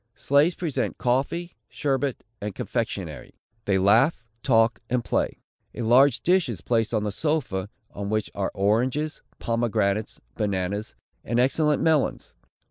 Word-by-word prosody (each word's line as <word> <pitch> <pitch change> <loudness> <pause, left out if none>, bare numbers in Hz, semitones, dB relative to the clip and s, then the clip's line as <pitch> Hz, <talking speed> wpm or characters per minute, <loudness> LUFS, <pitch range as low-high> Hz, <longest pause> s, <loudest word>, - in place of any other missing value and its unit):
Slaves 145 +5 +3
present 165 -6 -2
coffee, 140 +8 -1
sherbet, 140 -2 -1 0.2
and 105 -1 -4
confectionary. - - -4 0.3
They 100 -1 +2
laugh, 115 - +3 0.2
talk 115 -3 +3
and 125 -1 0
play. - - -1 0.3
A 120 - -3
large 125 +3 +5
dish 180 -4 +3
is 110 -7 -4
placed 115 +1 0
on 110 -2 0
the 105 - -1
sofa, 110 -8 -1 0.2
on 100 0 -5
which 110 -1 -1
are 100 -1 -1
oranges, 125 +10 0 0.2
pomegranates, 110 -3 -1 0.2
bananas, 100 - -2 0.3
and 120 +2 0
excellent 150 +3 +2
melons. 160 -3 +1
120 Hz, 130 wpm, -25 LUFS, 105-140 Hz, 0.3 s, large